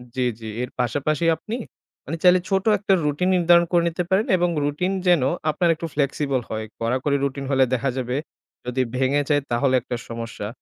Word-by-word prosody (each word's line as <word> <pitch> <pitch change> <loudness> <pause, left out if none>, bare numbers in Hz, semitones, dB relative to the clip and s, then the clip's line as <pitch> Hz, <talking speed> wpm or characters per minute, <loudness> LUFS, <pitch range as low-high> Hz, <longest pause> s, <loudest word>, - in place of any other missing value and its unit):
জি, 130 - -1 0.2
জি, 110 - -10 0.2
এর 125 - -5
পাশাপাশি 145 +6 0
আপনি 215 +8 -6 0.5
মানে 165 +4 -4
চাইলে 180 0 +6
ছোট 190 0 +1
একটা 200 0 +1
routine 150 +5 0
নির্ধারণ 175 0 +5
করে 175 -1 +3
নিতে 170 +2 -2
পারেন 195 +4 +2
এবং 175 0 +1
routine 150 +7 -1
যেন 175 -5 +5 0.3
আপনার 170 +3 +1
একটু 165 - -6
flexible 140 -2 0
হয়। 110 0 -3 0.2
কড়াকড়ি 130 +5 0
routine 140 0 -2
হলে 135 -1 +4
দেখা 130 +2 0
যাবে 125 0 -2 0.5
যদি 125 +1 -1
ভেঙে 135 +3 +2
যায় 145 -1 +3
তাহলে 130 +2 +2
একটা 125 - -4
সমস্যা। 115 -3 -5
145 Hz, 180 wpm, -23 LUFS, 130-175 Hz, 0.5 s, চাইলে